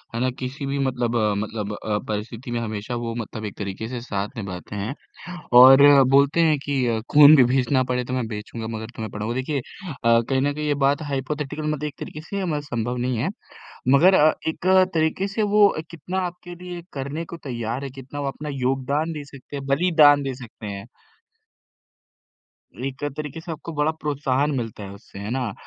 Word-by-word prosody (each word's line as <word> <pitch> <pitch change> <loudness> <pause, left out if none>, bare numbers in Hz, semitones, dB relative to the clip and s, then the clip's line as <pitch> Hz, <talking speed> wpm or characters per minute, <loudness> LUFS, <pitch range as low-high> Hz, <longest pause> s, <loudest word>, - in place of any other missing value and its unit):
है - - -1
ना? 130 - +2
किसी 135 +2 -5
भी 140 +1 -2
मतलब 125 -3 0
अ, 105 -2 +2
मतलब 105 0 -4
अ, 105 0 -2
परिस्थिति 110 +3 -5
में 120 - -1
हमेशा 110 +1 -4
वो 115 -1 -3
मतलब 110 -1 -5
एक 100 - -7
तरीके 100 +2 -5
से 125 -2 -5
साथ 105 -1 -4
निभाते 95 -1 -6
हैं 105 +7 -3 0.7
और 135 +2 +9
बोलते 140 +4 +4
हैं 155 -2 +4
कि 140 -3 0
अ, 115 -1 0
खून 150 +1 +9
भी 130 - +7
बेचना 130 0 +2
पड़े 125 0 -1
तो 125 - -5
मैं 125 -2 -1
बेचूँगा 110 +1 -6
मगर 110 0 -6
तुम्हें 110 -1 -5
पढ़ाऊँ 105 +2 -3
देखिए 135 +2 -1
अ, 120 -7 0
कहीं 135 -1 +2
न 145 +1 +1
कहीं 150 +1 -3
ये 145 - +2
बात 140 +3 +2
हाइपोथेटिकल 145 +2 -3
मतलब 150 -1 -2
एक 145 - -8
तरीके 155 - -7
से 195 +4 -4
मतलब 150 -4 -1
संभव 120 -3 -3
नहीं 125 0 -1
है। 125 +10 0 0.6
मगर 165 +8 +6
अ, 155 -3 +5
एक 160 +2 -3 0.3
तरीके 160 +5 +1
से 210 +2 -1
वो 205 0 +5 0.2
कितना 175 +3 -4
आपके 175 0 -10
लिए 175 0 -8
करने 140 +4 -4
को 170 - -8
तैयार 120 -1 -4
है, 140 - -4
कितना 135 +2 -9
वो 140 - -2
अपना 150 +2 -5
योगदान 135 +4 -1
दे 150 -1 -6
सकते 140 +1 -11
हैं, 135 - -6
बलिदान 145 -1 +5
दे 135 - -2
सकते 120 -3 -11
हैं। 100 -1 -6 2.0
एक 135 +1 -6
तरीके 150 0 -5
से 170 0 -7
आपको 160 +2 -7
बड़ा 150 +1 +1
प्रोत्साहन 145 -1 0
मिलता 115 -4 -4
है 100 - -8
उससे, 100 -1 -13
है 100 +2 -5
ना? 125 -5 -2
135 Hz, 200 wpm, -23 LUFS, 115-150 Hz, 2.0 s, और